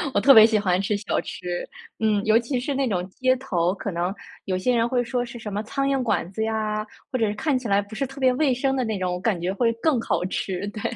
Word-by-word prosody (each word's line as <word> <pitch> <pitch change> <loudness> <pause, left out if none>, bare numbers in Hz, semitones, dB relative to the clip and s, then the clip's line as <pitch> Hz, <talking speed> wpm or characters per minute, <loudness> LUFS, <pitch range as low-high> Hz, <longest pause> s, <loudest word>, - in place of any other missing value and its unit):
我 - - +5
特 275 - +8
别 220 -2 +10
喜 220 -2 +2
欢 185 -2 +1
吃 200 +1 0
小 205 - -1
吃， 175 -1 -5 0.3
嗯， 215 -2 +1
尤 220 +1 +5
其 245 +2 -2
是 275 +3 -2
那 270 0 0
种 180 -5 -1
街 255 +6 +1
头， 185 -9 0
可 200 - -4
能 175 +2 -1 0.3
有 185 -1 -1
些 245 +7 +1
人 230 0 +2
会 245 0 +1
说 245 +1 -1
是 240 0 -8
什 215 -3 -7
么 205 - -1
苍 275 +5 -2
蝇 275 -1 +1
馆 225 -7 0
子 220 +3 -2
呀， 215 -1 -1 0.3
或 255 - -1
者 220 -2 +2
看 280 +4 0
起 250 -2 -5
来 200 -1 +3
不 205 +2 -12
是 275 +5 -1
特 270 +2 -11
别 260 -1 +4
卫 275 +1 +2
生 265 +2 0
的 260 - 0
那 220 -3 -2
种， 180 -1 -1
我 180 - -3
感 195 -2 0
觉 180 +3 -1
会 230 +3 +2
更 255 +3 +1
好 180 - -1
吃， 190 +1 -3
对。 210 +1 -8
220 Hz, 290 characters per minute, -24 LUFS, 195-255 Hz, 0.3 s, 别